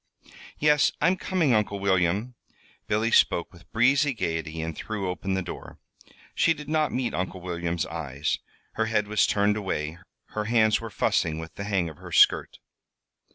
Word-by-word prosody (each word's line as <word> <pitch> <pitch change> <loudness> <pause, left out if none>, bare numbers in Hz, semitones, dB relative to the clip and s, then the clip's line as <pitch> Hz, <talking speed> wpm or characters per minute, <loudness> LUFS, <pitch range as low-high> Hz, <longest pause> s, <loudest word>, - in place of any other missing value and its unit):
"Yes, 150 -1 +4
I'm 175 +5 +3
coming, 180 -8 +1
Uncle 105 -2 +1
William." 100 +4 +1 0.5
Billy 110 +2 +1
spoke 85 - +3
with 85 0 -18
breezy 135 +4 +3
gayety, 80 -4 -3
and 80 0 -4
threw 105 -4 -4
open 95 +1 -2
the 95 - -1
door; - - -9 0.3
but - - -25 0.2
she 165 - +3
did 150 - -10
not 155 -1 +1
meet 125 -1 -1
Uncle 95 +1 -3
William's 85 -2 -2
eyes. 75 -3 -3 0.3
Her 110 0 -1
head 105 -2 0
was 105 0 +2
turned 105 +1 +2
away. 85 -5 -3 0.3
Her 105 0 -3
hands 110 -1 +3
were 115 - -6
fussing 85 -4 0
with 80 0 -8
the 100 - -6
hang 95 -4 0
of 80 - -9
her - - -11
skirt. - - +4
100 Hz, 170 wpm, -26 LUFS, 85-115 Hz, 0.5 s, Yes